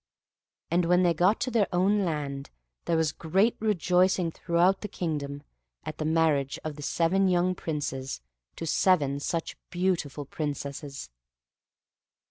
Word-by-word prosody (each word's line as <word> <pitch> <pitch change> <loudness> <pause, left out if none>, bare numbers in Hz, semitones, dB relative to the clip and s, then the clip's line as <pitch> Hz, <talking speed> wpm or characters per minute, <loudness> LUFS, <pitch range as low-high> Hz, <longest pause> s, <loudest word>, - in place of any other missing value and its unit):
And 175 0 +3
when 180 +2 +4
they 175 -1 +4
got 180 +6 +3
to 255 - -1
their 220 -4 +2
own 195 +3 +2
land, 145 -5 -3 0.4
there 165 - +1
was 160 -2 +2
great 190 +10 +1
rejoicing 185 -4 +2
throughout 175 +3 +2
the 210 - -4
kingdom, 145 -7 -4 0.4
at 155 - -6
the 155 - -2
marriage 155 -4 +2
of 155 -1 -4
the 150 - -9
seven 170 +6 +2
young 180 0 +2
Princes 145 - -4 0.4
to 165 - -5
seven 150 -5 +2
such 165 +3 -3
beautiful 175 -6 -1
Princesses. 140 - -5
165 Hz, 135 wpm, -28 LUFS, 145-185 Hz, 0.4 s, when